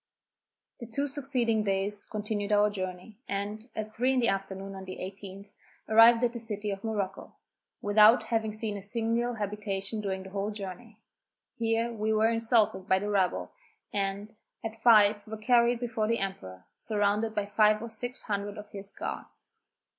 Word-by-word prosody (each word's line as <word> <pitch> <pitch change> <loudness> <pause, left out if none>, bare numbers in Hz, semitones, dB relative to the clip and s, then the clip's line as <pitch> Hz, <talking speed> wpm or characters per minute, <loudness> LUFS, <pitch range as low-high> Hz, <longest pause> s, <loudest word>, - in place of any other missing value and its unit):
The 235 - -7
two 280 +6 -1
succeeding 260 -6 0
days 200 0 -1
continued 210 -1 -3
our 210 0 +4
journey, 185 +2 -6
and, 205 +4 -4
at 215 0 -5
three 250 +3 +2
in 260 - +2
the 235 - +3
afternoon 195 0 -3
of 190 -1 -9
the 185 - -6
18th, 195 +1 -8 0.3
arrived 230 +2 +7
at 240 -1 +2
the 235 - -5
City 210 -2 -3
of 195 0 -6
Morocco, 210 -4 -3 0.5
without 210 +3 +6
having 225 -1 -1
seen 215 -1 -3
a - - -7
single 230 +3 -1
habitation 210 0 -3
during 190 -2 -3
the 190 - -11
whole 200 +1 -2
journey. 210 +2 -7 0.6
Here 230 +1 0
we 215 0 -1
were 220 +1 +4
insulted 225 -4 +2
by 190 - +5
the 205 +2 -2
rabble, 190 -3 0 0.4
and, 200 +2 -2 0.3
at 225 0 -4
five, 215 -2 +6
were 220 +1 -6
carried 235 +1 +3
before 225 -3 -1
the 230 +1 +2
emperor, 95 - -5
surrounded 210 +1 0
by 210 -1 0
five 215 +1 +4
or 230 +1 -7
six 245 +3 -4
hundred 205 -1 -3
of 210 0 -10
his 200 0 -6
guards. - - -7
210 Hz, 170 wpm, -29 LUFS, 200-225 Hz, 0.6 s, arrived